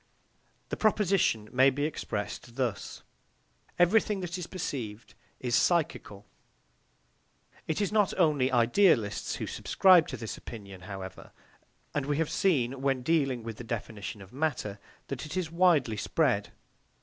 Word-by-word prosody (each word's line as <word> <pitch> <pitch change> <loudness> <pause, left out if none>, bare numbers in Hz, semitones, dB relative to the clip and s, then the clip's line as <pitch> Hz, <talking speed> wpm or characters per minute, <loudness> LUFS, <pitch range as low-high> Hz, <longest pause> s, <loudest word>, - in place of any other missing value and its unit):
This - - -4
proposition 190 - +2
may 130 +2 +6
be 140 +2 -2
expressed 115 -5 -4
thus: 125 -6 -3 0.7
Everything 200 +2 +3
that 175 -1 -4
is 180 -2 -5
perceived 120 - -5 0.3
is 125 -1 -3
psychical. 155 - 0 1.4
It 160 - -1
is 205 - 0
not 210 -2 +3
only 150 -7 +3
idealists 120 - +3
who - - -4
subscribe 185 -4 +4
to 130 - -5
this 110 -1 -6
opinion, 100 -5 -10
however, 95 -2 -8 0.6
and 145 -1 -1
we 145 -1 0
have 160 -1 0
seen, 135 -8 +1
when 135 -2 0
dealing 135 -5 +1
with 115 -1 -6
the - - -7
definition 110 -3 -5
of 95 - -17
matter, 130 -9 -2 0.3
that 140 +2 -5
it 155 - -5
is 170 -4 -2
widely 165 - +3
spread. 120 -2 0
135 Hz, 135 wpm, -29 LUFS, 115-170 Hz, 1.4 s, may